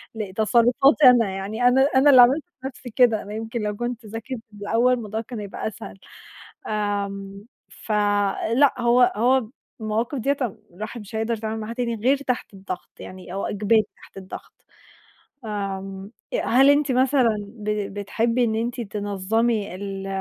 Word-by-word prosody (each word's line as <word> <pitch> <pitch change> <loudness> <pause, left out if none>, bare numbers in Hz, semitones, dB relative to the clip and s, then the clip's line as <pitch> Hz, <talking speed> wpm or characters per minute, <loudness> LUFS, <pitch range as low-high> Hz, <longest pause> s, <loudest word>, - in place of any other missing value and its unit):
لتصرفاتي 235 +7 +3
أنا، 230 -5 +4
يعني 200 +5 -4
أنا 260 +2 +4
أنا 275 +2 +6
اللي 255 -3 +9
عملت 270 +5 +5 0.2
في 265 - -4
نَفسي 255 -1 -9
كده، 230 -2 +3
أنا 205 +1 -9
يمكن 225 +1 -4
لو 210 -1 -2
كنت 240 0 -4
ذاكرت 225 +4 -6
من 205 - -13
الأول 235 +5 +2
الموضوع 220 -2 -3
كان 230 -1 -8
هيبقى 205 +1 -5
أسهل. 195 -2 -8 0.7
امم، 200 -1 -3 0.2
فلأ، 210 +5 +1
هو 245 +1 +4
هو 245 0 +2 0.3
المواقف 225 +5 -2
ديَّة 280 +4 0
أم 225 -3 -3
الواحد 215 +4 -7
مش 210 +2 -10
هيقدر 225 +1 -1
يتعامل 220 0 -4
معاها 220 +2 -5
تاني 235 -2 -2
غير 255 +6 +2
تحت 250 -6 -3
الضغط، 190 -2 -7
يعني 185 -1 -10
هو 195 - -3
إجباري 215 +2 +2
تحت - - -17
الضغط. 190 -1 -11 0.8
آمم، 195 -1 -5 0.2
أ - - +1
هل 270 +4 +5
أنتِ 285 -2 +3
مثلًا 255 -3 +3
ب 210 0 -10 0.3
بتحبي 230 +4 0
إن 220 -1 0
أنتِ 240 +2 -2
تنظمي 205 0 -1
ال 195 0 -6
220 Hz, 155 wpm, -23 LUFS, 205-245 Hz, 0.8 s, اللي